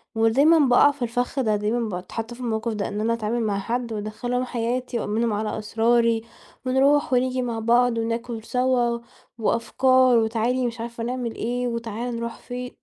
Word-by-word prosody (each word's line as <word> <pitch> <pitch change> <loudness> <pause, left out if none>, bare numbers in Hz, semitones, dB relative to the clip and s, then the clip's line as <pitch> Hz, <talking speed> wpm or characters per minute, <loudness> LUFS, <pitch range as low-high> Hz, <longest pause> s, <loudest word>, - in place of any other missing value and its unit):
ودايمًا 275 +9 +4
باقَع 275 +1 +5
في 285 -2 -17
الفخّ 245 +3 -1
ده، 215 -4 +2
دايمًا 220 +2 -1
باتحطّ 220 +6 -5
في 245 - -13
الموقف 230 -1 -2
ده 205 -2 -2
إن 210 +1 -4
أنا 230 +1 +1
أتعامل 230 +1 -1
مع 205 -3 0
حد 235 +2 -3
وأدخّلهم 245 +4 -3
حياتي 245 0 -2
وأأمنهم 220 +1 0
على 215 +1 -2
أسراري 230 +1 +2 0.4
ونروح 270 +2 +3
ونيجي 255 +1 +1
مع 235 -2 -3
بعض 240 +1 +3
وناكل 230 0 -3
سوا 245 -1 +1 0.4
وأفكار 255 +2 +3
وتعالي 230 +3 +1
مش 230 0 -6
عارفة 235 0 -5
نعمل 245 -1 -3
إيه، 245 +2 -2
وتعالَ 235 +1 -4
نروح 235 0 -4
فين 250 0 -7
235 Hz, 165 wpm, -24 LUFS, 225-250 Hz, 0.4 s, باقَع